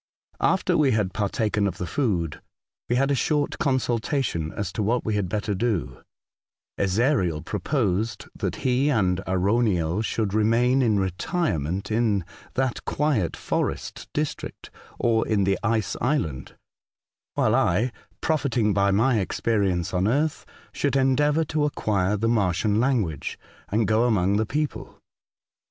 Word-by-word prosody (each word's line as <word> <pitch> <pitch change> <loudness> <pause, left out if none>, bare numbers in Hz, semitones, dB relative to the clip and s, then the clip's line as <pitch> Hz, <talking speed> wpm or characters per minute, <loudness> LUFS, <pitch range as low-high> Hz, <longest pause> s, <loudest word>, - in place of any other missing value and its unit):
After - - +2
we 140 -5 +4
had 100 -4 0
partaken 105 0 0
of 95 - -4
the 90 - -3
food, 90 - -1 0.5
we 120 - +2
had 135 +3 +2
a - - +3
short 145 +2 0
consultation 125 - 0
as 105 - -3
to - - -2
what 115 +4 0
we 110 - 0
had 100 -3 -1
better 105 +1 -1
do, 100 - -2 0.8
Ezariel 95 - +1
proposed 110 -6 -1
that - - -2
he 130 +3 +3
and 95 -9 +2
Arauniel 95 -2 +1
should 110 -3 -1
remain 115 +5 +3
in 110 -5 +3
retirement 95 - -1
in 110 -5 +1 0.3
that 130 -2 -1
quiet 140 - 0
forest - - -3
district, - - -4 0.3
or 115 -2 +1
in 105 -3 +2
the 95 0 +1
Ice 115 -2 0
Island, 85 - -1 0.8
while - - +2
I, 120 +3 +2 0.3
profiting 130 -9 +1
by 100 0 +3
my 110 +4 +3
experience 95 -3 0
on 90 +2 +1
earth, 150 +6 0 0.3
should 140 -1 0
endeavour 145 +4 +3
to 150 0 0
acquire 105 -8 0
the 115 +3 0
Martian 105 -1 +1
language, 115 - 0 0.3
and 110 +2 +1
go 110 +2 +3
among 100 -4 +2
the 110 0 0
people. 150 +1 -3
110 Hz, 140 wpm, -25 LUFS, 95-130 Hz, 0.8 s, we